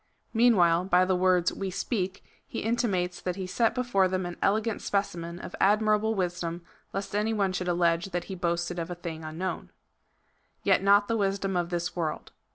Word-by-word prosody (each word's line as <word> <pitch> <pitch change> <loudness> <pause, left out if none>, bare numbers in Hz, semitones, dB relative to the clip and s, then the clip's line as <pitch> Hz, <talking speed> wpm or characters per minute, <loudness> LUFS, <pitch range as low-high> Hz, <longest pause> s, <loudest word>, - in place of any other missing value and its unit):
Meanwhile, 185 -8 +4
by 185 -1 +4
the 185 0 +1
words 180 -1 +3
we 195 -1 -3
speak, 190 0 -3 0.2
he - - -4
intimates 200 -6 0
that 180 -1 -2
he 190 -1 -4
set 185 +5 +1
before 240 -7 +2
them 185 0 -1
an 175 0 -5
elegant 215 +2 +1
specimen 175 -4 -2
of - - -8
admirable 215 +1 +3
wisdom, 175 -2 -2 0.3
lest 195 +1 -4
any 215 +2 +1
one 195 -3 +1
should 180 0 -2
allege 170 -1 +2
that 175 -2 -2
he 195 - -7
boasted 175 -1 -1
of 165 +1 -4
a 175 - -4
thing 165 -2 -7
unknown. 160 +4 -4 0.9
Yet - - +4
not 200 +1 +5
the 230 - 0
wisdom 195 -1 0
of 175 -1 0
this 175 0 -2
world. 165 -3 -3
185 Hz, 180 wpm, -28 LUFS, 175-200 Hz, 0.9 s, not